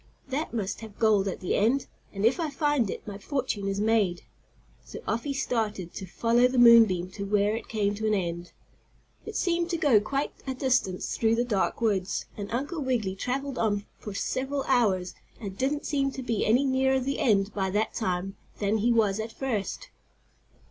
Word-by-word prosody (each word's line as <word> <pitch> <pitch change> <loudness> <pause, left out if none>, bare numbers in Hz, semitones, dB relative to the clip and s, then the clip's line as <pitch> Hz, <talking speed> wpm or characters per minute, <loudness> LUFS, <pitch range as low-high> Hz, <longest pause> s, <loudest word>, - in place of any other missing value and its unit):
"That 285 +4 -2
must 210 -3 -3
have 220 -2 -10
gold 210 -3 +3
at 190 - -4
the 185 - -1
end, 240 +7 +2 0.3
and, 200 +1 -2
if 245 +9 +3
I 325 -2 0
find 290 -6 +1
it, - - -6
my 200 -1 -7
fortune 240 -5 -2
is 195 0 -1
made." 210 -5 +1 0.6
So - - -9
off 230 +4 -1
he 285 - -1
started 215 -9 -2
to 190 - -7
follow 235 +6 +3
the 255 0 -3
moon 235 -1 +9
beam 180 -2 -3
to 200 +1 -6
where 205 +1 +1
it 225 - -6
came 205 -2 0
to 215 +1 -2
an 215 - +3
end. 175 -2 -3 0.8
It - - -6
seemed 345 -1 0
to 340 - 0
go 285 -9 +5
quite 275 +7 -2
a 265 - -2
distance 250 -8 0
through 225 0 +2
the 240 +1 +1
dark 210 -1 0
woods, 200 -5 0
and 205 -1 -6
Uncle 285 +7 -2
Wiggily 240 -8 0
traveled 270 +6 -3
on 205 -2 0
for 205 -2 -7
several 270 +6 -2
hours, 200 -9 +1 0.3
and 200 -4 -5
he - - -14
didn't 275 +6 -1
seem 275 -2 +1
to 265 - -6
be 230 -4 0
any 245 +6 +4
nearer 265 0 +2
the 270 +2 -2
end 205 -4 +2
by 190 -2 -1
that 210 +3 0
time 190 -2 -2 0.2
than 210 +1 0
he 235 +3 +2
was 215 -3 +2
at 220 +1 -4
first. 225 -6 -3
225 Hz, 200 wpm, -27 LUFS, 200-260 Hz, 0.8 s, moon